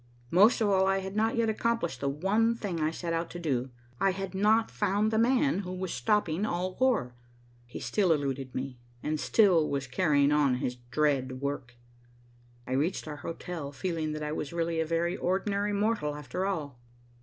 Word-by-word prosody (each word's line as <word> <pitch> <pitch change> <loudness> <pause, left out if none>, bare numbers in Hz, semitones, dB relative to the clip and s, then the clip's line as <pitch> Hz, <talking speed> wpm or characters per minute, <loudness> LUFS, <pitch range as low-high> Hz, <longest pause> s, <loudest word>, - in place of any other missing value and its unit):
Most 205 +7 +5
of 215 - +3
all, 190 -1 +3
I 195 0 +3
had 190 +1 -5
not 220 +1 +1
yet 230 -1 +2
accomplished 230 -4 -1
the 140 - +1
one 205 +10 +1
thing 195 -7 -4
I 155 - +2
set 170 +1 -4
out 165 0 -1
to 175 - -7
do. 135 -6 -1 0.3
I 195 -1 +3
had 195 0 -5
not 215 +4 +3
found 205 +1 +1
the 220 - +2
man 255 0 +3
who 180 -2 -5
was 185 -1 -4
stopping 205 -5 +1
all 185 -2 -2
war. 235 - +2 0.5
He 120 - -7
still 180 +8 +1
eluded 135 -4 -1
me, 130 -1 -4 0.2
and 155 0 -1
still 180 -7 +4
was 140 -1 -1
carrying 145 +1 +2
on 145 -3 +3
his 125 0 -3
dread 130 -2 +1
work. 140 -3 -4 0.9
I - - -8
reached 150 +7 0
our 150 -1 -5
hotel 165 -1 -6
feeling 160 -1 -2
that 155 0 -4
I 150 - -3
was 150 -2 -4
really 165 -1 -1
a 160 - 0
very 170 +1 0
ordinary 200 +3 0
mortal, 205 -8 0
after 150 +7 -3
all. 145 -10 -3
170 Hz, 190 wpm, -29 LUFS, 145-200 Hz, 0.9 s, Most